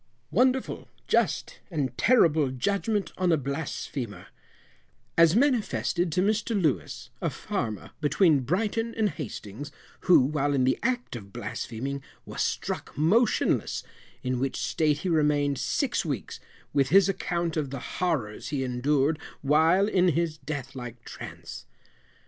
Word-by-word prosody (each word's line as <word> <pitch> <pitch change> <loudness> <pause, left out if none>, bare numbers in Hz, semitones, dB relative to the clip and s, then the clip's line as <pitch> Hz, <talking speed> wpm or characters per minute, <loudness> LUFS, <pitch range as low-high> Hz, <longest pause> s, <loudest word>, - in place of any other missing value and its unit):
WONDERFUL, 255 +8 +1 0.2
JUST, - - +1 0.2
& 130 -3 -1
TERRIBLE 160 - +4
JUDGMENT 200 - 0
ON 180 -1 +3
A 160 - +4
BLASPHEMER, 135 - -4 0.9
As 165 +1 +6
manifested 225 - +1
to 180 +4 +2
Mr 215 +1 +1
Louis, 155 -8 -1
a - - +1
Farmer, 110 -2 -4
between 150 +1 +4
Brighton 215 - -1
and 220 -2 +2
Hastings, 135 - -7 0.3
who, 180 - +6
while 145 +1 +1
in 130 - +2
the 130 +1 +2
act 245 - -1
of 100 -4 -9
blaspheming, 135 +8 -4 0.2
was - - -4
struck - - -3
motionless, 210 +10 +2 0.4
in 125 -1 -1
which 135 +1 -1
state 150 -2 +1
he - - +1
remained 145 -4 +2
six 240 - 0
weeks, 140 -9 -4 0.3
with 135 -2 +2
his 195 +3 +6
account 170 -3 -1
of 150 -4 -1
the 135 -1 -6
Horrors 135 -13 -1
he 135 -1 -1
endured 135 +4 +1 0.2
while 160 +7 +4
in 185 -3 +3
his 165 -1 0
death 140 -4 -5
like 120 -2 -8
Trance. - - -9
155 Hz, 135 wpm, -27 LUFS, 135-190 Hz, 0.9 s, As